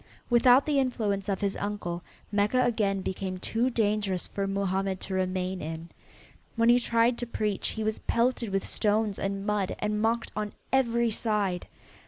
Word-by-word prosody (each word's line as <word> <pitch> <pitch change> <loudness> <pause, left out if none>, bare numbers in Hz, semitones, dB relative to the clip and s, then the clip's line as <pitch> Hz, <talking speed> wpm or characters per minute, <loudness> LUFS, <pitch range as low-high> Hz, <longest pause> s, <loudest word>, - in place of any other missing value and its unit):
Without 245 +3 +6
the 290 -2 +2
influence 210 -7 -1
of 195 - -1
his 200 -1 0
uncle 200 -4 -3 0.3
Mecca 210 +5 +2
again 205 -5 +1
became 185 0 -3
too 230 +7 0
dangerous 210 -5 0
for 200 -1 -3
Mohammed 195 -1 -1
to 190 - -5
remain 185 0 -1
in. 160 +2 -6 0.7
When 230 0 +3
he 240 +1 +6
tried 235 0 +2
to 240 - -3
preach 210 -3 -1
he 220 - -3
was 215 0 -1
pelted 235 -1 0
with 195 0 -1
stones 210 -1 0
and 195 0 -2
mud 210 -2 0
and 210 0 -1
mocked 230 +1 0
on 210 0 -3 0.2
every 235 -3 +3
side. 205 -5 0
210 Hz, 165 wpm, -28 LUFS, 195-230 Hz, 0.7 s, Without